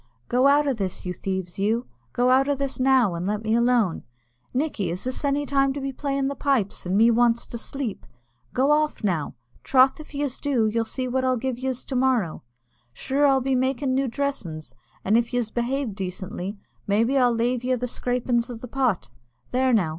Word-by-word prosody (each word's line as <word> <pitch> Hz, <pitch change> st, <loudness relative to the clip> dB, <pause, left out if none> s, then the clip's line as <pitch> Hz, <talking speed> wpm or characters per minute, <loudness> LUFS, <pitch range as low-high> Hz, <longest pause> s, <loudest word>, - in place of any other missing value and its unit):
"Go 255 Hz, +2 st, +4 dB
out 290 Hz, +1 st, +4 dB
o' 275 Hz, -, +2 dB
this, 195 Hz, -6 st, -4 dB
you 180 Hz, -, -2 dB
thieves, 190 Hz, -1 st, -4 dB
you 225 Hz, +5 st, +1 dB, 0.3 s
go 250 Hz, +1 st, +2 dB
out 270 Hz, +2 st, +4 dB
o' 285 Hz, -, +2 dB
this 275 Hz, -1 st, -3 dB
now, 255 Hz, -6 st, +4 dB
an' 175 Hz, +2 st, -3 dB
let 210 Hz, +1 st, -2 dB
me 220 Hz, 0 st, 0 dB
alone. 235 Hz, -6 st, +2 dB, 0.5 s
Nickey, 250 Hz, -, -1 dB
is 175 Hz, +2 st, -4 dB
this 255 Hz, +3 st, -3 dB
any 285 Hz, 0 st, +1 dB
time 275 Hz, -1 st, +2 dB
to 285 Hz, -, -4 dB
be 270 Hz, 0 st, -4 dB
playing 275 Hz, 0 st, -1 dB
the 280 Hz, -, -1 dB
pipes, 265 Hz, -11 st, -1 dB
and 185 Hz, +2 st, +1 dB
me 230 Hz, +2 st, +6 dB
wants 235 Hz, 0 st, +3 dB
to 235 Hz, -, -7 dB
sleep? 260 Hz, -4 st, -5 dB, 0.4 s
Go 270 Hz, +3 st, +2 dB
off, 300 Hz, -3 st, +1 dB
now 170 Hz, -9 st, -1 dB, 0.3 s
troth 265 Hz, +3 st, +4 dB
if 305 Hz, -1 st, -11 dB
yez 280 Hz, -2 st, -2 dB
do, 265 Hz, -6 st, +1 dB
you'll 225 Hz, +1 st, 0 dB
see 255 Hz, +3 st, -3 dB
what 260 Hz, +1 st, 0 dB
I'll 255 Hz, -1 st, +2 dB
give 250 Hz, 0 st, -3 dB
yez 260 Hz, -1 st, -3 dB
to 265 Hz, -, -4 dB
morrow. 250 Hz, -9 st, +1 dB, 0.5 s
Sure 275 Hz, -, +1 dB
I'll 270 Hz, -1 st, +3 dB
be 265 Hz, +1 st, 0 dB
makin' 260 Hz, +1 st, 0 dB
new 270 Hz, +1 st, +1 dB
dressin's; 230 Hz, -, -4 dB, 0.3 s
and 215 Hz, +4 st, +4 dB
if 240 Hz, +1 st, -1 dB
yez 235 Hz, -3 st, -1 dB
behave 245 Hz, 0 st, -1 dB
decently, 190 Hz, +1 st, -5 dB, 0.3 s
maybe 225 Hz, +6 st, +2 dB
I'll 250 Hz, -2 st, +4 dB
lave 240 Hz, +1 st, 0 dB
yez 255 Hz, -1 st, 0 dB
the 250 Hz, -, -1 dB
scrapin' 245 Hz, 0 st, -1 dB
o' 245 Hz, -, -5 dB
the 230 Hz, +2 st, -8 dB
pot. 250 Hz, -, 0 dB, 0.4 s
There 260 Hz, +1 st, +2 dB
now. 200 Hz, -9 st, +3 dB
250 Hz, 205 wpm, -24 LUFS, 220-270 Hz, 0.5 s, me